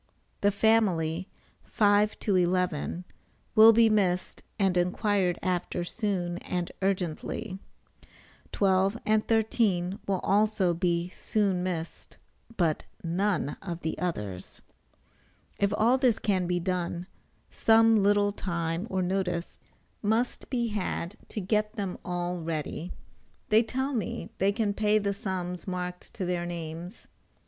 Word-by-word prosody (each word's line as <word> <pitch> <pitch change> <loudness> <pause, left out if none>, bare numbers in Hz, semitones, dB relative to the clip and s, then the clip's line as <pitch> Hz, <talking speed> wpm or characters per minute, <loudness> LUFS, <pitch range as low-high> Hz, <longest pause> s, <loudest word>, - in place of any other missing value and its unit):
The 205 - +4
family 190 -5 +2 0.3
5 205 0 +3
to 200 - +1
11 180 -1 0 0.5
will 220 0 +9
be 230 0 +5
missed 190 -4 +1 0.2
and 195 -3 +2
inquired 180 0 +1
after 180 -1 -1
soon 180 -3 -2
and 180 -1 -3
urgently; 190 +2 -2 0.9
12 195 +1 +2
and 215 0 +2
13 210 -5 +1
will 195 -1 +1
also 205 -3 +2
be 170 0 0
soon 195 -1 0
missed, 170 -3 -5 0.4
but 165 -4 +1 0.2
none 175 -2 0
of 175 -3 -5
the 160 - -2
others. 105 - -4 1.0
If 200 0 +2
all 240 +4 +4
this 250 -4 +3
can 190 -5 0
be 175 0 0
done, 175 -1 -2 0.5
some 225 -1 +5
little 205 0 +3
time 170 -1 -3
or 190 -1 0
notice 180 -2 -2 0.4
must 225 +4 0
be 240 -3 0
had 200 -2 -3
to - - -5
get 210 +2 0
them 195 -4 -4
all 175 0 -2
ready. 160 +1 -4 0.6
They 215 +1 +6
tell 265 +4 -2
me 210 -3 -3
they 195 +1 +3
can 210 -1 0
pay 210 +1 +2
the 200 -1 0
sums 185 -2 -4
marked 180 -1 -5
to 185 - -3
their 175 -1 -1
names. 170 +1 -7
190 Hz, 125 wpm, -28 LUFS, 175-210 Hz, 1.0 s, will